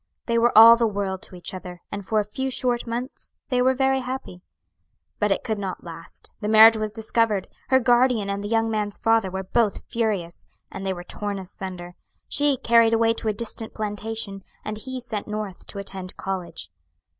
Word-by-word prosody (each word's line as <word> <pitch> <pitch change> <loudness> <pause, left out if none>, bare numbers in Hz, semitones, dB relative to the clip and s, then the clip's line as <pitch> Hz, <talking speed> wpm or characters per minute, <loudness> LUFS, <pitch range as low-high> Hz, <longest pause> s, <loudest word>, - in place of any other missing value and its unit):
They 235 -1 +1
were 235 -1 +3
all 230 +1 +11
the 230 -1 +2
world 195 -2 -3
to - - -10
each 175 - -7
other, 180 -1 -8
and 200 0 -5
for 215 +3 +1
a - - +1
few 265 +6 -3
short 245 -2 0
months 245 +4 -5
they 250 -1 +2
were 260 +1 +3
very 265 0 +2
happy. 255 -8 -6 0.8
"But 210 -1 +1
it - - 0
could 220 -2 -2
not 190 -2 -5
last; 165 -1 -7
the 210 - -2
marriage 220 +1 +8
was 215 -1 -2
discovered 220 -2 0 0.2
her 260 0 +5
guardian 245 -3 +3
and 200 0 -3
the - - -3
young 225 +1 +1
man's 210 -2 -1
father 225 -3 +2
were 190 +1 -4
both 210 +2 0
furious, 205 -7 -2 0.3
and - - -7
they 190 - -1
were 175 -1 -8
torn 205 +2 -4
asunder; 180 -1 -7 0.3
she 290 -2 +1
carried 230 -1 +4
away 225 0 +3
to 225 - -5
a 215 - +2
distant 225 +1 -5
plantation, 210 -1 -4 0.2
and 215 0 -4
he 260 +3 -5
sent 225 -4 -5
North 210 -3 -5
to - - -9
attend 190 -2 -6
college. 175 - -5
215 Hz, 195 wpm, -24 LUFS, 195-230 Hz, 0.8 s, all